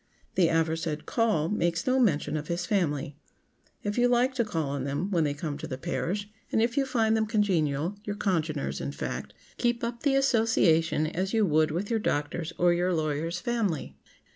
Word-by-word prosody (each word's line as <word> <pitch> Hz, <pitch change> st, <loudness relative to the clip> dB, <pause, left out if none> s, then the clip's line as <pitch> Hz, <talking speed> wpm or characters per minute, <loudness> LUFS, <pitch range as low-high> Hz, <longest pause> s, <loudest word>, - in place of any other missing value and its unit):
The 180 Hz, -3 st, +4 dB
aforesaid 160 Hz, -1 st, 0 dB
"call" 220 Hz, -10 st, +1 dB
makes 170 Hz, -4 st, 0 dB
no 260 Hz, 0 st, +3 dB
mention 175 Hz, -, +2 dB
of 150 Hz, 0 st, -3 dB
his 175 Hz, +1 st, -2 dB
family. 150 Hz, -8 st, -1 dB, 0.7 s
If 205 Hz, +3 st, -1 dB
you 245 Hz, -, +5 dB
like 245 Hz, +2 st, +3 dB
to 250 Hz, -2 st, +1 dB
call 165 Hz, -9 st, -2 dB
on 140 Hz, -2 st, -2 dB
them 145 Hz, +8 st, -2 dB
when 170 Hz, -4 st, +2 dB
they 145 Hz, -1 st, -1 dB
come 150 Hz, -2 st, -4 dB
to 160 Hz, -, -5 dB
the 130 Hz, -4 st, -5 dB
parish, 170 Hz, +11 st, -2 dB, 0.2 s
and -, -, +2 dB
if 235 Hz, +2 st, +1 dB
you 275 Hz, -1 st, +1 dB
find 225 Hz, -5 st, +2 dB
them 220 Hz, -1 st, +1 dB
congenial—your 200 Hz, -1 st, 0 dB
congeners, 155 Hz, -, -1 dB
in 70 Hz, +1 st, -4 dB
fact—keep 240 Hz, -, -3 dB
up 235 Hz, 0 st, -3 dB
the 280 Hz, -2 st, +2 dB
association 220 Hz, -, +3 dB
as 185 Hz, +6 st, -2 dB
you 220 Hz, -2 st, +4 dB
would 155 Hz, -2 st, +3 dB
with 180 Hz, +8 st, -3 dB
your 225 Hz, -, +2 dB
doctor's, 160 Hz, -1 st, -1 dB
or 175 Hz, 0 st, +4 dB
your 175 Hz, +1 st, +1 dB
lawyer's 155 Hz, +2 st, -1 dB
family. 225 Hz, -, -2 dB
175 Hz, 185 wpm, -28 LUFS, 155-220 Hz, 0.7 s, you